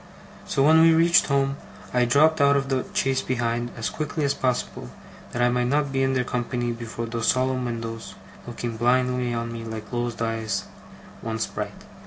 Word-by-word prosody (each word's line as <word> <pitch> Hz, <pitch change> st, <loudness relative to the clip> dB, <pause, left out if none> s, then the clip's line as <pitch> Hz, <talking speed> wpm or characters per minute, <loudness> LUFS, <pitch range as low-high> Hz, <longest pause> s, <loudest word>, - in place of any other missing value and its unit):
So, 135 Hz, -, +1 dB
when 160 Hz, +1 st, +7 dB
we 165 Hz, 0 st, +6 dB
reached 170 Hz, +1 st, +5 dB
home, 140 Hz, 0 st, +1 dB, 0.4 s
I 125 Hz, 0 st, +3 dB
dropped 145 Hz, +5 st, +4 dB
out 140 Hz, 0 st, +5 dB
of 135 Hz, 0 st, -2 dB
the 130 Hz, -1 st, 0 dB
chaise 135 Hz, -1 st, +1 dB
behind, 120 Hz, -1 st, -1 dB
as 110 Hz, -, -2 dB
quickly 155 Hz, -1 st, -2 dB
as 140 Hz, -, +2 dB
possible, 125 Hz, -, -2 dB, 0.4 s
that 120 Hz, -, 0 dB
I 120 Hz, -, +4 dB
might 125 Hz, 0 st, +1 dB
not 145 Hz, +1 st, +1 dB
be 135 Hz, 0 st, 0 dB
in 135 Hz, 0 st, +2 dB
their 130 Hz, -1 st, +1 dB
company 120 Hz, 0 st, -2 dB
before 115 Hz, 0 st, -5 dB
those 115 Hz, 0 st, -3 dB
solemn 130 Hz, 0 st, +1 dB
windows, 115 Hz, -1 st, -5 dB, 0.3 s
looking 120 Hz, -1 st, -5 dB
blindly 125 Hz, +1 st, +2 dB
on 115 Hz, 0 st, -3 dB
me 115 Hz, 0 st, -6 dB
like 110 Hz, -1 st, -7 dB
closed 120 Hz, -1 st, -2 dB
eyes 110 Hz, -4 st, -1 dB, 0.6 s
once 110 Hz, 0 st, -2 dB
bright. -, -, -6 dB
125 Hz, 185 wpm, -24 LUFS, 115-135 Hz, 0.6 s, when